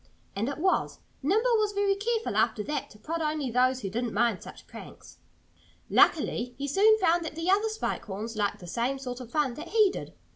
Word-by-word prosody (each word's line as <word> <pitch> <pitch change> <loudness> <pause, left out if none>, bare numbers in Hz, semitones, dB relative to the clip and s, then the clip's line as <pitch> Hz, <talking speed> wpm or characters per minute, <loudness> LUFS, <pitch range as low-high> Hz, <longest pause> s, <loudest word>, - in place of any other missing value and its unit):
And 220 +6 -1
it 280 - -4
was. 370 +4 0 0.2
Nimble 440 - +2
was 420 -1 0
very 400 0 +2
careful, 450 +3 -2
after 215 - +1
that, 295 - -3
to 210 - -16
prod 325 +10 -4
only 300 -4 -1
those 255 +2 +2
that 195 - -3
didn't 235 0 -3
mind 230 -2 +1
such - - -11
pranks. - - -12 0.7
Luckily 245 -5 +3
he 280 +1 -3
soon 420 +9 +5
found 345 -4 +2
that 320 - -6
the 330 +3 0
other 415 +3 +3
Spike 435 0 -3
Horns 215 +3 -5
liked 205 -2 0
the 180 - -12
same 240 +9 -1
sort 250 -2 -6
of 250 -3 -9
fun 285 -1 0
that 310 +7 -8
he 430 -3 +4
did. - - -8
290 Hz, 210 wpm, -28 LUFS, 240-390 Hz, 0.7 s, soon